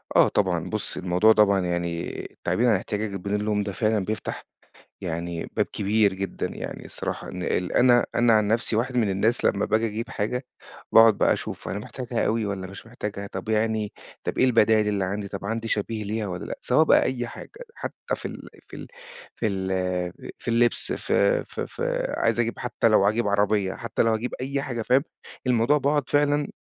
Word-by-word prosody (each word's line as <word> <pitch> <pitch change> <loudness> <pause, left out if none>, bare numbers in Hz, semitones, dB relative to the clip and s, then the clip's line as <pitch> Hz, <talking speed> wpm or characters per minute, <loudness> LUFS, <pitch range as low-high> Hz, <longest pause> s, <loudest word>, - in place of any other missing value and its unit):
آه - - +7
طبعًا، 90 -5 0
بُص، 110 -1 -2
الموضوع 90 +4 +4
طبعًا 100 -2 +4
يعني 85 -2 -2 0.3
تعبير 120 +2 +2
عن 110 - +5
احتياجك 100 +1 -3
بدون 100 +3 -2
لوم، 105 -1 0
ده 100 - -3
فعلًا 105 -1 0
بيفتَح 110 +2 -4 0.6
يعني 85 0 -3
باب - - +2
كبير 105 0 +1
جدًا. 95 +1 -3
يعني - - -6
الصراحة - - -5
إن 90 0 -5 0.3
أنا 120 -1 +5
أنا 120 -1 +4
عن 105 -1 +3
نفسي، 115 +1 +1
واحد 125 +3 0
من 110 -4 +2
الناس 105 +5 +1
لمّا 100 +1 +2
باجي 110 +2 +1
أجيب 110 +2 -5
حاجة، 125 +5 -2 0.5
باقعُد 115 -2 +7
بقى - - +4
أشوف - - -6
أنا 100 - -3
محتاجها 120 +2 -3
أوي 115 0 +1
والّا 100 -2 -4
مش 100 +4 -11
محتاجها، 105 -4 -5
طَب 95 +2 -7
يعني 110 -1 0 0.3
طَب - - -3
إيه - - +5
البدايِل 110 -3 +4
اللي 100 -2 0
عندي، 100 +2 -3
طَب 100 0 -6
عندي 115 +2 -2
شبيه 110 0 -2
ليها 105 0 -2
والّا 90 -1 -5
لأ، - - -5
سواء 130 +5 +4
بقى - - +5
أي 120 -2 -2
حاجة، - - -10 0.3
حتى - - -4
في - - -11
ال - - -9 0.2
في - - -11
ال - - -8 0.5
في 110 - -1
ال 95 -1 -2 0.7
في - - -14
اللبس، 120 +1 +2
في - - +2
في - - -5
في - - -2
عايز 115 0 +1
أجيب 115 0 -1
حتى 125 -1 0
لو 105 -3 +4
هاجيب 110 +2 +2
عربية، 100 -1 +1
حتى 115 - -2
لو 115 -1 +3
هاجيب 115 +3 -2
أي 140 +1 -2
حاجة، 120 -4 -3
فاهم؟ 130 +5 +3 0.4
الموضوع 125 +4 +3
باقعُد 145 0 0
فعلًا 145 0 +2
110 Hz, 190 wpm, -25 LUFS, 100-120 Hz, 0.7 s, آه